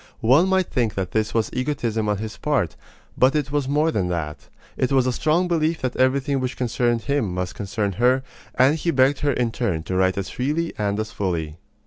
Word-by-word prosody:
One 135 +11 +5
might 190 -1 +3
think 115 -4 0
that 95 -2 -3
this 110 0 -1
was 115 -1 +1
egotism 120 -5 -1
on 105 - +1
his 110 +1 -5
part; 130 - -1 0.4
but 130 +3 +3
it 145 -2 -1
was 145 -2 0
more 150 +3 +2
than 95 - 0
that. 80 -4 -4 0.3
It 130 - 0
was 135 -2 +3
a 130 - +1
strong 160 +8 +1
belief 165 -1 0
that 130 - -1
everything 135 +2 +1
which 130 0 -3
concerned 120 -1 0
him 140 -9 0
must 90 0 -3
concern 100 -1 -2
her; 125 +6 +2 0.3
and 130 +4 +4
he 170 - -2
begged 135 -2 +3
her 145 -1 +1
in 120 -2 0
turn 95 -10 -2
to 95 - -4
write 95 0 +2
as 100 0 -3
freely 150 +6 -1
and 105 -1 -1
as 110 0 -3
fully. 85 -7 -3
125 Hz, 210 wpm, -23 LUFS, 105-140 Hz, 0.4 s, One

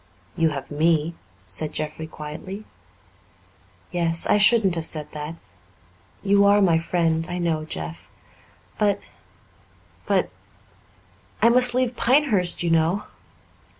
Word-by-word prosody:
"You 165 -1 +2
have 140 -2 -7
me," 160 +1 +1 0.3
said 100 - -4
Jeffrey 155 +1 -4
quietly. 160 +7 -8 1.3
"Yes. 170 -2 +1
I 210 - +3
shouldn't 210 -3 +5
have 165 -1 +2
said 150 -2 -2
that. 150 +2 -6 0.9
You 200 0 +4
are 200 +1 +5
my 175 -5 +3
friend, 165 -1 0
I 175 - -4
know, 165 -3 -1
Jeff. 80 - -7 0.7
But, 205 -1 +2 1.1
but - - +1 1.1
I 230 - +5
must 245 0 +5
leave 255 -1 0
Pinehurst, 235 -12 +2
you 170 - 0
know." 165 +5 +1
170 Hz, 115 wpm, -23 LUFS, 155-200 Hz, 1.3 s, shouldn't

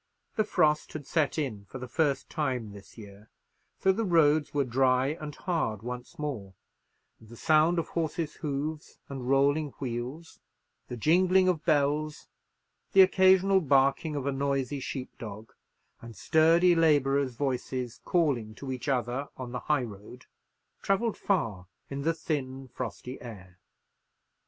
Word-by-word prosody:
The 215 - +2
frost 155 -7 +1
had 150 -3 -6
set 155 0 0
in 115 -10 -3
for 130 - -9
the 125 0 -7
first 145 0 0
time 130 -8 -2
this 100 +3 -14
year; 100 -1 -13 0.5
so 190 - +5
the 220 +4 -1
roads 155 -5 +3
were 145 -1 +1
dry 130 +1 +2
and 150 -1 -7
hard 135 - -2
once 125 +1 -7
more, 115 -11 -5 0.6
and 110 - -17
the 120 - -12
sound 155 +5 +3
of 165 - -1
horses' 160 -1 -3
hoofs 150 +1 -4
and 130 -2 -5
rolling 140 +2 +2
wheels, 130 +5 -5 0.5
the 125 - -6
jingling 185 - +4
of 175 -4 +1
bells, 150 -1 0 0.6
the 195 - +8
occasional 190 +1 +5
barking 140 +1 +2
of 140 -2 -3
a 140 - +1
noisy 140 0 -1
sheep 130 0 -6
dog, 110 0 -9 0.5
and 115 -1 -10
sturdy 165 +2 +4
labourers' 140 -5 +2
voices 130 -2 -3
calling 130 -11 0
to 135 +2 -6
each 130 +2 -5
other 130 +1 -1
on 125 -2 -6
the 125 - -3
high 150 -4 +3
road, 110 +3 -10 0.6
travelled 205 +3 0
far 110 - -1 0.2
in 140 0 -3
the 165 +3 0
thin 135 -5 -4
frosty 125 +2 -6
air. 95 -6 -11
140 Hz, 145 wpm, -28 LUFS, 125-160 Hz, 0.6 s, the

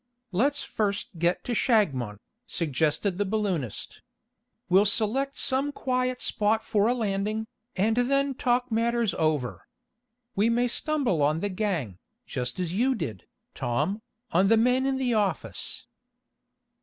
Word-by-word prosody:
"Let's 275 +10 +1
first 205 -2 -2
get 175 +2 +1
to - - -4
Shagmon," 140 - +1 0.3
suggested 165 +4 0
the - - +3
balloonist. 190 - -2 0.7
"We'll 190 +3 +5
select 245 +7 +1
some 275 +2 +1
quiet 255 -2 -1
spot 220 +1 +1
for 210 -1 +2
a 245 - +2
landing, 215 -1 -1 0.3
and 215 +4 +2
then 275 +3 +2
talk 245 0 0
matters 230 -2 +1
over. 155 -7 -1 0.7
We 210 +4 +3
may 240 +1 +2
stumble 260 - 0
on 150 +3 +2
the 205 - -1
gang, 180 - -2 0.3
just 125 +3 -3
as 175 -2 -2
you 255 +6 +2
did, 115 - -5 0.3
Tom, 185 - -1 0.3
on 185 +4 +4
the 225 +2 +5
men 250 +3 +3
in 270 -1 0
the 255 -2 0
office." 190 - -1
210 Hz, 135 wpm, -27 LUFS, 175-245 Hz, 0.7 s, We'll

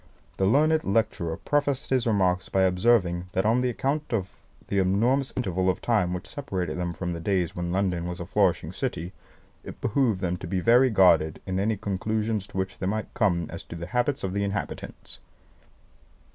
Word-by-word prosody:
The 95 - +2
learned 155 +7 +3
lecturer 95 -6 0
prefaced 145 -3 -1
his 130 -2 +2
remarks 95 -4 +1
by 95 - +2
observing 90 -2 +2
that 95 +1 +1
on 120 +3 +3
account 135 +5 -1
of 100 -5 -1 0.4
the 100 - 0
enormous 115 +9 +2
interval 95 -6 0
of 95 - 0
time 105 -7 +1
which 90 +1 -4
separated 90 - -4
them 85 -1 -2
from 90 +2 -3
the 85 - -5
days 90 -1 0
when 85 0 -3
London 90 -2 0
was 90 +1 -5
a 85 - -5
flourishing 95 -1 +1
city, 85 +3 -3 0.5
it - - -9
behoved 115 -4 +1
them 90 -1 -1
to 90 - -7
be 95 +1 -1
very 120 +7 +5
guarded 85 -7 +4
in 95 0 -2
any 105 +2 +1
conclusions 105 +1 -2
to - - -9
which 95 0 -3
they 95 - -2
might 110 +2 -3
come 95 -8 +1
as - - -7
to - - -8
the 85 0 -5
habits 125 - -1
of 95 -1 -2
the 100 0 0
inhabitants. 100 0 -5
95 Hz, 185 wpm, -26 LUFS, 90-115 Hz, 0.5 s, very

